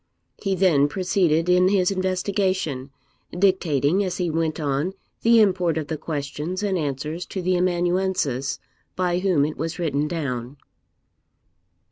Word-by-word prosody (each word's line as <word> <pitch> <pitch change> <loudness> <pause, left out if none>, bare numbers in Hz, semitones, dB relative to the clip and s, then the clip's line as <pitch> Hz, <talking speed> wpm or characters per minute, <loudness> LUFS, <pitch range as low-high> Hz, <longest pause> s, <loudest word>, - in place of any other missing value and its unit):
He 195 -2 0
then 165 -7 +4
proceeded 175 -1 +1
in 180 0 +4
his 190 -1 +2
investigation, 185 -6 -1 0.5
dictating, 180 -2 +2
as 185 -1 -3
he 175 -3 -1
went 160 0 -1
on, 145 +4 -1 0.3
the 230 0 +5
import 180 -6 +2
of 155 -2 -3
the 160 - -2
questions 155 +5 -4
and 200 -2 0
answers 150 +1 -3
to 190 - -5
the 185 0 +1
amanuensis, 175 -6 0 0.4
by 180 -1 0
whom 180 -7 +2
it 155 - -4
was 165 +1 -3
written 150 -4 0
down. 140 -5 -4
175 Hz, 135 wpm, -23 LUFS, 150-185 Hz, 0.5 s, the